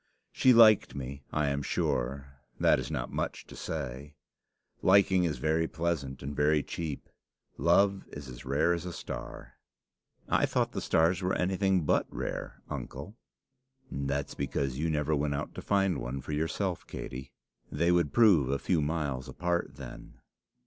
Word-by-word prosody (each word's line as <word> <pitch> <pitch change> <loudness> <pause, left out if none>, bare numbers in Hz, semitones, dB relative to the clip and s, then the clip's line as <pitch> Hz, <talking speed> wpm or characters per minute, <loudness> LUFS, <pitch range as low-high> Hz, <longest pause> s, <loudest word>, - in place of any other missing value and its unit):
She 130 - +4
liked 115 -3 +6
me 70 +1 -6
I 75 -2 +1
am 70 0 -1
sure. 70 0 -2 0.2
That - - +4
is - - -4
not - - -3
much - - -3
to - - -12
say. 70 -1 -5 0.7
Liking 95 -1 +5
is 75 -5 -1
very 80 +4 +1
pleasant 80 -5 -3
and 70 +1 -5
very 75 0 +3
cheap. 80 -4 -5 0.5
Love 95 +3 +3
is 70 -2 -9
as 65 -2 -9
rare 75 +6 +2
as 85 -1 -3
a 90 -1 -5
star." - - -8 0.7
"I - - +2
thought - - 0
the - - -4
stars 85 +3 +2
were 90 0 0
anything 95 0 +1
but - - +2
rare, - - -5
uncle." 70 +11 -6 0.8
"That's 70 +1 -2
because 70 -1 -2
you 80 +2 0
never 75 0 +1
went 70 0 0
out 70 - -4
to - - -7
find 95 -3 +1
one 65 +3 -4
for 65 +3 -7
yourself, 80 +4 -2
Katey. 65 +1 -7 0.4
They 85 +4 +2
would 85 -4 +2
prove 95 - +5
a 70 - +1
few 85 +2 +1
miles 75 -3 -2
apart 85 0 -2
then." 70 -4 -10
75 Hz, 160 wpm, -30 LUFS, 70-85 Hz, 0.8 s, liked